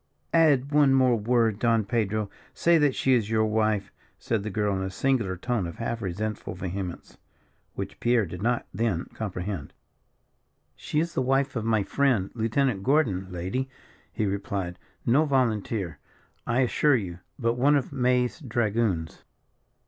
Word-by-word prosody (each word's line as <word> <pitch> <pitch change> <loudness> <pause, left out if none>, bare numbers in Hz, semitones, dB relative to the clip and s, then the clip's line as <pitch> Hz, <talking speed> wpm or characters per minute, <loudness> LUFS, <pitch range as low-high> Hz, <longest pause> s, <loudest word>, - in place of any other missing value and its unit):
"Add 145 -5 +4
one 145 -2 +5
word 120 -5 +2
more, 120 -2 +4
Don 115 0 +1
Pedro; 105 0 0 0.3
say 170 -1 +4
that 145 -3 +3
she 135 - +2
is 115 -4 +2
your 110 -1 +2
wife," 110 -2 0 0.3
said 115 -3 -1
the 105 - -4
girl 105 0 0
in 95 - -2
a 95 - -2
singular 105 -3 0
tone 115 -2 -1
of 85 - -7
half 115 0 -3
resentful 105 +2 -4
vehemence, 95 -1 -6 0.6
which - - -6
Pierre 120 -3 +3
did 90 +1 -8
not 120 +2 0
then 100 -4 0
comprehend. 95 -6 -5 1.0
"She 150 - -2
is 170 +1 -1
the - - 0
wife 135 +1 +1
of 115 -2 -2
my 110 -2 +2
friend, 125 -6 +1
Lieutenant 115 -1 0
Gordon, 110 -8 +1
lady," 95 +10 -3 0.4
he 110 - -1
replied; 95 -2 -3 0.3
"no 135 +7 +4
volunteer, 110 - 0 0.5
I 120 +2 +2
assure 140 +3 +3
you, 90 -7 -3 0.2
but 115 0 +1
one 135 +5 +3
of 140 0 -1
May's 125 +1 +1
dragoons." 110 - -1
115 Hz, 155 wpm, -26 LUFS, 100-130 Hz, 1.0 s, one